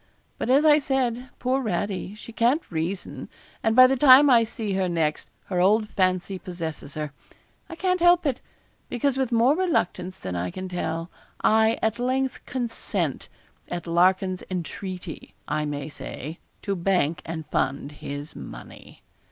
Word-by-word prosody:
But - - -2
as 280 +4 +5
I 300 -1 +7
said, 260 -3 -1
poor 260 +2 0
Radie, 200 -2 -3
she 230 - -10
can't 245 +8 +1
reason; 175 +4 -4 0.3
and 225 0 +1
by 255 0 +10
the 265 +1 +3
time 270 +1 +8
I 235 -2 +6
see 220 -2 -3
her 190 -1 0
next, 160 -3 -1 0.2
her 180 -2 0
old 210 +3 +3
fancy 185 -1 0
possesses 160 -6 -6
her. 150 -2 -4 0.6
I 330 - -7
can't 365 +1 0
help 350 0 +5
it; 270 -4 0 0.5
because 260 +2 0
with 260 -2 0
more 240 +5 +4
reluctance 190 - -1
than 90 -1 -5
I 90 +1 -2
can 185 - -6
tell, 165 -1 -3 0.3
I 220 +1 +4
at 220 +1 +1
length 260 +1 -1
consent, 245 -3 -2 0.4
at 175 -2 -4
Larkin's 185 +2 +2
entreaty, 180 -1 -6
I 150 0 -1
may 145 -1 -4
say, 155 +1 -7 0.2
to 200 - -1
bank 170 -4 +1
and 160 -1 -5
fund 140 +1 -1
his 145 0 -7
money.' - - -11
195 Hz, 155 wpm, -25 LUFS, 170-255 Hz, 0.6 s, by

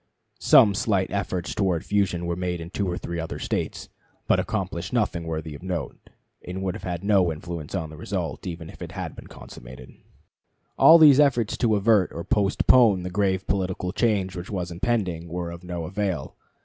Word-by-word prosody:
Some 105 - +6
slight 100 -2 0
efforts 95 -3 -2
towards 95 -5 0
fusion 95 -4 0
were 85 0 -2
made 90 0 -3
in 85 +1 -8
two 100 -1 -2
or 85 - -3
three 85 0 -5
other 80 0 -5
States, - - -3 0.4
but - - +3
accomplished 85 +1 -3
nothing 95 -8 0
worthy 80 -1 -4
of 70 - -10
note, 90 -2 -5 0.3
and 95 +1 -5
would 95 -2 -1
have - - -8
had 90 -1 -4
no 100 -4 +3
influence 80 +1 -6
on 80 -4 -3
the 80 - -11
result, - - -4
even 85 -2 -6
had - - -14 0.3
it - - -18
been - - -11
consummated. 65 +1 -12 0.8
All 165 - +8
these 150 -4 +7
efforts 130 -7 +3
to 115 -4 +2
avert 105 -2 +3
or 85 - -5
postpone 105 0 +3
the 90 - -5
grave 95 -1 0
political 95 -1 -2
change 100 -4 0
which 90 +1 -7
was 90 -4 -4
impending 90 -4 -1
were 85 0 -4
of 85 +1 -10
no 90 -1 -5
avail. 95 -5 -3
90 Hz, 185 wpm, -25 LUFS, 85-100 Hz, 0.8 s, All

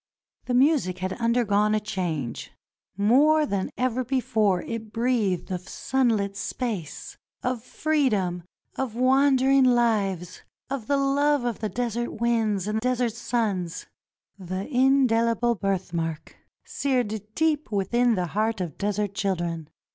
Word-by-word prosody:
The 250 - -1
music 260 - +3
had 185 +1 -3
undergone 215 -2 +2
a - - +2
change 175 - -4 0.3
— - - -70
more 290 +9 +4
than 200 -8 -2
ever 255 0 0
before 225 -7 +1
it 225 -2 -6
breathed 225 -7 0
of 180 0 -5
sunlit 225 -7 0
space, 205 - -5 0.3
of 250 -2 -1
freedom, 240 - 0 0.4
of 260 -5 -3
wander 265 +1 +3
ing 275 -1 +5
lives, 205 -8 +1 0.3
of 260 -6 -4
the 280 - +2
love 280 0 +2
of 235 -3 -2 0.2
desert 240 -1 -2
winds 220 -5 +1
and 215 +1 0
desert 250 -1 0
suns 220 -7 -2 0.3
— - - -70 0.2
the 185 +1 -4
indehble 240 -3 +3
birthmark 170 -5 -3 0.2
— - - -62
seared 250 - -1
deep 310 -3 0
within 230 +4 +2
the 180 -2 -1
heart 220 +1 0
of 175 -6 -5
desert 205 0 -1
children. 170 -5 -2
225 Hz, 130 wpm, -25 LUFS, 195-255 Hz, 0.4 s, ing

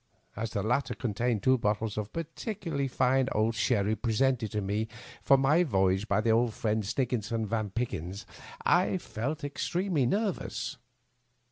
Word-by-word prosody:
As 110 +2 -3
the 100 -2 -2
latter 125 +6 0
contained 115 -2 -1
two 130 -1 +4
bottles 105 -1 0
of 105 -1 -4
particularly 165 - -3
fine 130 0 +2
old 110 +2 +2
sherry 110 -1 +1
presented 115 +1 +1
to 105 - -1
me 105 +2 -1 0.3
for 135 - +5
my 140 +5 +4
voy 95 - +3
age 95 +3 -1
by 100 0 +2
my 115 +1 +2
old 115 0 +2
friend 110 0 0
Snigginson 115 -1 -1
van 110 -1 -1
Pickyns, 100 -3 -4 0.4
I 180 +2 +3
felt 145 -1 -4
ex 145 0 -3
tremely 175 -7 +1
nervous. 200 - -2
115 Hz, 155 wpm, -29 LUFS, 105-135 Hz, 0.4 s, for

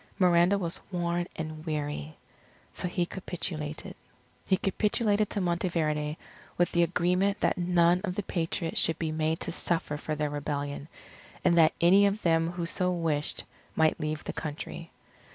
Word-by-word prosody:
Miranda 180 0 +5
was 175 -3 -3
worn 175 -1 -1
and 155 -1 -5
weary. 150 -1 -3 0.6
So - - -2
he 175 0 0
capitulated. 160 -5 -4 0.5
He 190 - +4
capitulated 210 +2 +1
to 200 - -2
Monteverde, 165 -4 0 0.4
with 175 - +2
the 170 - +3
agreement 180 +4 +2
that - - +2
none 175 0 +3
of 180 - -2
the 205 - -2
Patriots 165 -2 -1
should 165 -1 +2
be 160 -2 -2
made 155 +1 0
to - - -1
suffer 165 -4 -1
for 155 +1 -3
their 150 -1 -1
rebellion; 145 0 -3 0.6
and 175 -2 +5
that 160 -1 +6
any 195 +4 +6
of 200 +2 -2
them 165 -1 +3
who 175 -1 -3
so 180 +2 0
wished, 160 -4 0 0.3
might 160 -1 +3
leave 155 0 -2
the - - -5
country. 160 +2 -6
170 Hz, 155 wpm, -29 LUFS, 155-180 Hz, 0.6 s, that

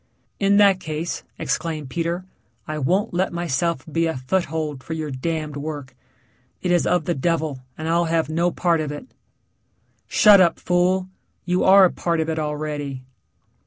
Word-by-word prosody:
"In 200 0 +3
that 200 -2 +5
case," 160 0 -4 0.2
exclaimed 155 -4 -3
Peter, 170 +3 -2 0.4
"I 155 -1 -3
won't 185 +10 0
let 185 +2 0
myself 170 -3 -1
be 165 +1 0
a 160 - -2
foothold 150 0 -2
for 160 - -5
your 155 -2 -4
damned 155 +2 -3
work 145 -2 -6 0.7
it 180 - +1
is 175 -1 +2
of 175 -4 +1
the 175 - 0
devil 160 -2 -1 0.2
and 160 - -5
I'll 170 +1 +2
have 165 -1 +1
no 170 +3 +1
part 170 -2 +1
of 150 -2 -3
it." 150 - -7 1.0
"Shut 205 -2 +7
up, 170 -2 +3
fool. 180 +1 +1 0.4
You 180 0 +1
are 195 0 +8
a 180 - +2
part 170 -1 -1
of 160 0 -1
it 160 - -2
already." 150 -3 -4
165 Hz, 165 wpm, -22 LUFS, 150-175 Hz, 1.0 s, are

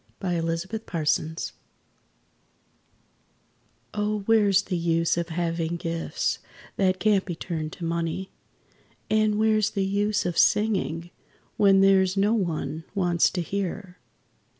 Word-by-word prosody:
WHERE'S 165 -2 -1
THE 220 +4 -5
USE 160 -1 -1 2.4
Oh, 210 0 -1
where's 200 -2 +3
the 180 - -2
use 165 -1 +1
of 170 0 -2
having 165 0 -1
gifts 165 -1 -2 0.4
that 185 -1 +1
can't 205 0 +3
be 175 - -5
turned 160 -2 -4
to 175 - -6
money? 170 +3 -2 0.8
And 215 -1 +3
where's 215 -1 +3
the 195 -2 -1
use 205 +1 0
of 175 -2 0
singing, 185 -6 +1 0.5
when 195 -1 +5
there's 190 -1 +4
no 205 +3 +3
one 165 -6 -2
wants 175 -3 +3
to 180 - -3
hear? 190 +1 -4
185 Hz, 120 wpm, -25 LUFS, 165-200 Hz, 2.4 s, when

